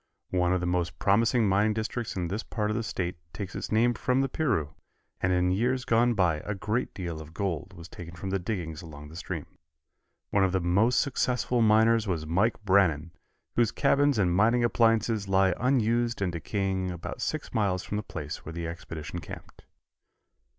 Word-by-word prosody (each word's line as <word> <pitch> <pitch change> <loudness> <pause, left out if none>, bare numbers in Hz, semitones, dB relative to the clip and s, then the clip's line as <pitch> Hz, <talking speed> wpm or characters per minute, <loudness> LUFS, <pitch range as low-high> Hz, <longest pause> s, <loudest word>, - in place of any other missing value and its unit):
One 90 -1 +2
of 90 -1 +1
the - - -1
most 90 -1 -1
promising 115 +3 +3
mining 105 +2 +2
districts 110 +1 -3
in 90 -2 -1
this 100 +6 -3
part 105 -2 -2
of - - -1
the 115 - 0
State 90 -5 -3 0.2
takes 100 -3 -6
its - - -5
name 115 +3 +3
from 125 +3 +1
the 135 - +1
Piru, 115 - 0 0.5
and 90 - +2
in 90 0 +2
years 125 +6 0
gone 120 +1 +3
by 90 -6 +2
a 105 +7 -4
great 110 +6 -2
deal 85 -4 -4
of 80 +1 -12
gold 95 -2 -3
was 85 -1 -10
taken 85 -1 -10
from 95 +3 -5
the 95 - 0
diggings 90 -4 -4
along 75 -3 -10
the 80 - -12
stream. 85 - -5 0.9
One 100 - +3
of 95 -1 +1
the 95 - +2
most 100 +8 +3
successful 125 -3 0
miners 110 0 +4
was 85 -5 -1
Mike 95 +8 +1
Brannan, 85 -5 +3 0.4
whose 120 -3 +3
cabins 140 -1 +3
and 90 -4 +2
mining 115 +5 +4
appliances 115 -3 +2
lie 95 -1 +3
unused 120 -2 +1
and 95 -3 0
decaying 95 +2 -2
about 85 -2 -6
six - - -3
miles 95 -4 +1
from 105 - -3
the - - -1
place - - -6
where 80 - -7
the 85 0 -4
expedition 85 0 -6
camped. - - -11
100 Hz, 190 wpm, -28 LUFS, 90-115 Hz, 0.9 s, miners